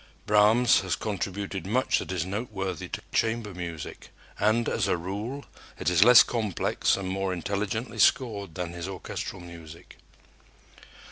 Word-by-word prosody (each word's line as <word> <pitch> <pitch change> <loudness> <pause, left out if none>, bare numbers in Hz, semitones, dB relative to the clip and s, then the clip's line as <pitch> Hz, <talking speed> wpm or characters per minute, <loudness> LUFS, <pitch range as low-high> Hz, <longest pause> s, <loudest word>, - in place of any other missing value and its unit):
Brahms 110 +4 +5
has 95 -2 -1
contributed 100 -1 -4
much 125 +6 +2
that - - -6
is 90 -3 -1
noteworthy 95 -1 -4
to - - -6
chamber 110 -2 0
music, 85 -3 -7 0.3
and, 110 +3 +2
as 105 -4 0
a 95 - +1
rule, 105 +11 -5 0.3
it - - 0
is 90 +2 +6
less 125 +1 +9
complex 110 -6 0
and 95 -1 -4
more 95 0 -1
intelligently 100 +6 -3
scored 100 -9 +2
than 90 -2 -4
his 85 +1 -5
orchestral 95 0 -6
music. 85 -1 -12
100 Hz, 140 wpm, -27 LUFS, 90-110 Hz, 0.3 s, less